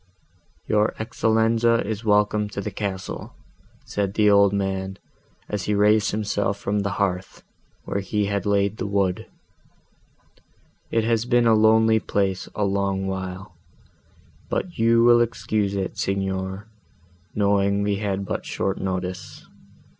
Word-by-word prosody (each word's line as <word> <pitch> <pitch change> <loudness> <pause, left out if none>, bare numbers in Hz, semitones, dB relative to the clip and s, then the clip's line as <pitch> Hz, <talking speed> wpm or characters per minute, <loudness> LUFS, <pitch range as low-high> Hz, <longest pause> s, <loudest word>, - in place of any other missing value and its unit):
"Your 105 0 +2
Excellenza 115 +1 +1
is 110 +1 -4
welcome 105 0 +2
to 100 - -6
the 105 +1 -4
castle," 95 -2 -5 0.5
said 100 -1 -2
the 105 -1 +4
old 100 -1 +5
man, 95 -1 -2 0.5
as 105 -3 -3
he 105 - 0
raised 105 +1 +3
himself 105 -1 -1
from 100 +1 -1
the 100 -1 -2
hearth, 95 -2 -2 0.4
where 100 - -2
he 100 +2 -1
had 100 0 -2
laid 100 +1 +1
the 95 - -3
wood: 100 -2 0 1.6
"it 115 - +1
has 115 0 +1
been 120 0 +3
a 115 - +5
lonely 110 +1 +4
place 95 -3 -1
a 105 - 0
long 100 -1 -1
while; 95 -1 -5 1.0
but 175 - -3
you 115 +1 +4
will 120 0 +6
excuse 110 -3 -1
it, 95 -1 -3
Signor, 95 0 -2 0.7
knowing 100 -1 +2
we 100 -1 0
had 100 -1 -2
but - - -3
short 95 - -2
notice. 95 -1 -4
100 Hz, 135 wpm, -23 LUFS, 95-110 Hz, 1.6 s, will